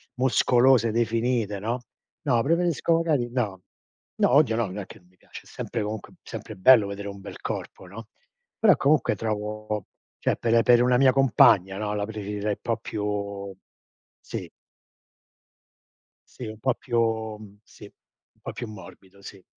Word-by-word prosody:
muscolose, 125 -1 +3
definite, 115 -2 0
no. 120 +4 -3 0.4
No, 120 -5 +2
preferisco 170 +1 +1
magari 150 -8 0
no. 105 -8 -2 0.6
No, - - +3
odio 140 -6 +4
no, 115 - +1
non 95 +3 -6
è 95 - -5
che 110 - -14
non 90 - -27
mi 90 - -29
piace, - - -12
è - - -18
sempre 115 - -5
comunque 105 0 -6
sempre - - -8
bello 110 0 +6
vedere 100 0 -6
un 100 0 -9
bel 100 - -10
corpo, - - -6
no. 110 +4 -11 0.5
Però 210 -7 +6
comunque 145 0 +2
trovo 105 -1 -4 0.3
cioè, - - +1
per 115 0 +3
per 120 -1 +5
una 125 0 +3
mia 130 -1 +5
compagna, 100 -8 +4
no, 105 0 -2
la 105 - -1
preferirei 105 -1 -4
un - - -4
po' 115 - -1
più 100 -2 -4 0.7
sì. - - -7 1.9
Sì 125 - -7
un 110 0 -8
po' 130 +1 +1
più 110 -3 -2
sì. 105 - -15
Un - - -24
po' - - -6
più 120 - -6
morbido, 95 -1 -13
si. 95 -2 -11
110 Hz, 160 wpm, -25 LUFS, 100-125 Hz, 1.9 s, bello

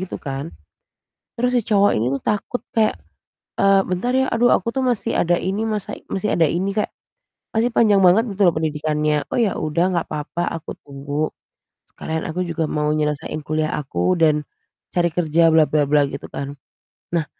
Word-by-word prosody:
gitu, 185 - -5
kan, 140 +3 -5 0.9
terus 250 +1 +2
si - - +5
cowok 205 -2 +3
ini 115 +3 0
tuh - - -6
takut 210 +4 -2
kayak, 220 - +3 0.7
eee, 195 0 +5
"Bentar 185 +8 -1
ya, 265 0 +2
aduh 240 +1 +3
aku 200 - +1
tuh 265 -1 -1
masih 245 -4 0
ada 175 0 +2
ini 200 +4 -1
masa 210 -2 -3 0.2
masih 205 +2 -1
ada 165 - +4
ini," 190 +5 -1
kayak 210 - -1 0.6
masih 230 +2 +2
panjang 210 -3 +5
banget 185 +6 +5
gitu 195 -1 +2
loh 175 - +4
pendidikannya. 150 -1 0
"Oh, - - -4
ya 220 -5 +1
udah, 170 +4 +1
enggak 170 - 0
apa-apa, 155 +3 -3
aku 165 - -6
tunggu, 145 +2 -3 0.6
sekalian 160 0 -4
aku 180 +3 -2
juga 165 -1 -2
mau 150 0 0
nyelesain 150 0 -2
kuliah 155 0 -1
aku, 135 - 0
dan 150 -2 +3 0.5
cari 175 -1 +2
kerja 165 0 +3
bla-bla-bla," 150 -2 +3
gitu, - - -7
kan. 140 0 -5 0.6
Nah 160 -3 +1
165 Hz, 170 wpm, -21 LUFS, 150-200 Hz, 0.9 s, si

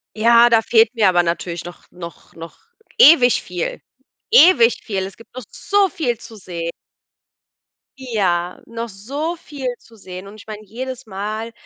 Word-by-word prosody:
Ja, 235 +2 +5
da 230 -1 +4
fehlt 225 +1 +3
mir 220 -5 +2
aber 175 -1 +3
natürlich 170 0 -3
noch 175 0 -12
noch 170 -2 -12
noch 165 0 -11 0.4
ewig 260 -5 +6
viel, 180 -2 -5 0.5
ewig 355 - +5
viel. 195 -3 -3
Es 195 - -10
gibt 230 -1 -19
noch 255 0 -8
so 405 -1 +1
viel 305 -11 -3
zu 225 0 -13
seh 170 -4 -6 1.3
Ja, 190 -9 -2
noch 230 0 -6
so 275 - -5
viel 285 -5 -8
zu 230 - -21
sehen. 185 -1 -10
Und 200 - -12
ich 215 +1 -15
meine, 215 -1 -8
jedes 255 +5 -7
Mal 215 +2 -5
220 Hz, 160 wpm, -19 LUFS, 185-245 Hz, 1.3 s, ewig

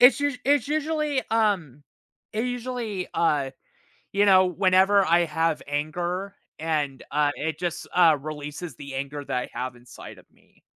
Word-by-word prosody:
it's 250 +3 +7
usu 285 -2 0
it's 280 -2 +3
usually, 305 -2 0
um, 195 - +1 0.5
it 220 +2 -1
usually, 245 -6 -3
uh, 145 -5 +1 0.6
you 200 +1 +4
know, 185 -2 +6
whenever 190 +2 +4
I 170 +1 +4
have 160 0 0
anger 175 +7 -3 0.2
and, 150 -4 -1
uh, 145 -1 +2
it 160 0 -3
just, 175 -1 -3
uh, 165 -4 +6
releases 150 +1 -6
the 140 +1 -8
anger 140 +2 -4
that - - -2
I 125 - -3
have 125 0 -4
inside 120 0 -12
of - - -17
me. - - -29
175 Hz, 155 wpm, -25 LUFS, 150-210 Hz, 0.6 s, it's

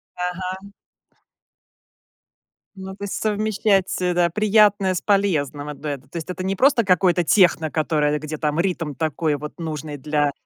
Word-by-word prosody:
Ага. 185 +2 -5 2.0
Ну, 190 0 -8
то 200 - -10
есть 200 - -4
совмещать, 210 -2 0
э, 180 -1 +1
да, 175 0 +2
приятное 205 0 +3
с 180 - -3
полезным- 155 -8 0
одно 150 +1 -6
это. 135 -2 -6
То 170 - -8
есть 165 - -6
это 185 0 -4
не 195 +1 -1
просто 260 -1 +3
какое-то 180 -1 +3
техно, 170 -3 +3
которое, 150 -1 0
где 155 +1 -6
там 150 +1 -1
ритм 170 -5 -1
такой 155 +1 -1
вот 150 +4 -8
нужный 155 -2 -5
для 145 +1 0
175 Hz, 155 wpm, -22 LUFS, 150-195 Hz, 2.0 s, приятное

